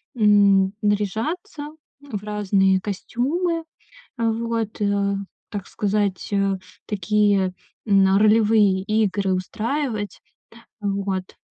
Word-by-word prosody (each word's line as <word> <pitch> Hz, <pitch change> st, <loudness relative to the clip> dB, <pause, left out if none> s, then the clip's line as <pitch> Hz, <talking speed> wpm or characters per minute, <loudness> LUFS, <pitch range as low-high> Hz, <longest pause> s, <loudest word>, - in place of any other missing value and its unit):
м, 200 Hz, -3 st, +4 dB
наряжаться 225 Hz, -, -2 dB, 0.3 s
в 215 Hz, -8 st, -6 dB
разные 195 Hz, -2 st, +2 dB
костюмы. 315 Hz, -, -2 dB, 0.5 s
Вот, 230 Hz, -1 st, -1 dB
э, 200 Hz, -1 st, +1 dB, 0.4 s
так 205 Hz, -2 st, -5 dB
сказать, 205 Hz, -2 st, -1 dB
э, 195 Hz, -1 st, +1 dB, 0.3 s
такие, 205 Hz, -1 st, +1 dB, 0.3 s
м, 195 Hz, -1 st, +4 dB
ролевые 210 Hz, -3 st, +4 dB
игры 200 Hz, -2 st, +1 dB
устраивать. 220 Hz, +3 st, -2 dB, 0.6 s
Вот. 195 Hz, -2 st, -3 dB
205 Hz, 85 wpm, -23 LUFS, 195-225 Hz, 0.6 s, м